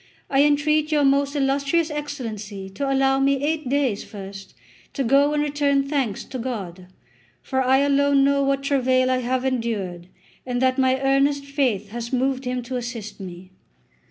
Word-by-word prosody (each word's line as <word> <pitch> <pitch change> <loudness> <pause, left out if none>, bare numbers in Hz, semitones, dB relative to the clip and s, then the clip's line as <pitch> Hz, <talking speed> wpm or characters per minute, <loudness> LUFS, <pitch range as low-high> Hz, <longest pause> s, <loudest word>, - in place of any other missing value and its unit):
I 270 0 +4
entreat 300 +1 +2
your 295 -1 +3
most 280 +1 +2
illustrious 280 +4 +1
Excellency 220 -10 -6
to 275 +7 -2
allow 270 0 +2
me 275 +1 +3
eight 305 -2 -1
days 265 -7 0
first 195 -3 -10 0.4
to 275 - -1
go 275 +4 +4
and 295 0 +1
return 285 -1 +1
thanks 270 -8 -1
to 260 - -7
God; 195 -8 -5 0.6
for 265 -1 -1
I 265 +1 +3
alone 280 0 +3
know 280 0 +3
what 275 0 0
travail 260 -2 +2
I 255 - +1
have 255 +1 -1
endured, 210 -9 -2 0.4
and 250 -1 -2
that 260 +1 +2
my 260 0 +3
earnest 275 +1 +2
faith 255 -8 -1
has 235 +2 -6
moved 260 +1 0
Him 250 0 -2
to 255 +2 -4
assist 235 -4 -6
me. 185 -1 -9
265 Hz, 165 wpm, -23 LUFS, 235-280 Hz, 0.6 s, I